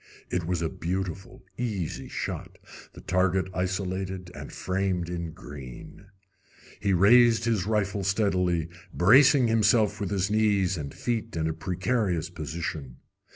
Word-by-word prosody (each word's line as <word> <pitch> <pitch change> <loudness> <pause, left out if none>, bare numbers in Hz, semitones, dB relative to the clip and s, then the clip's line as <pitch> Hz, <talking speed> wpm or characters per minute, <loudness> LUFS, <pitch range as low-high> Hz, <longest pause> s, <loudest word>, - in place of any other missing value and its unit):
It 90 -2 -1
was 90 -2 -1
a - - +1
beautiful, 95 +3 -4 0.2
easy 105 -9 -3
shot, - - -5 0.4
the - - -12
target 95 +1 +1
isolated 95 0 -3
and - - -8
framed 95 -2 -1
in 85 -2 -4
green. 75 +2 -11 0.7
He 100 - 0
raised 115 +5 +5
his 110 -5 0
rifle 105 -2 0
steadily, 90 -4 +1 0.2
bracing 130 +7 +6
himself 110 -1 +3
with 100 0 -1
knees 105 -4 +2
and 75 -4 -5
feet 115 -4 -3
in 80 -1 0
a 80 - -1
precarious 95 -1 -1
position. 80 -5 -5
95 Hz, 125 wpm, -27 LUFS, 85-105 Hz, 0.7 s, bracing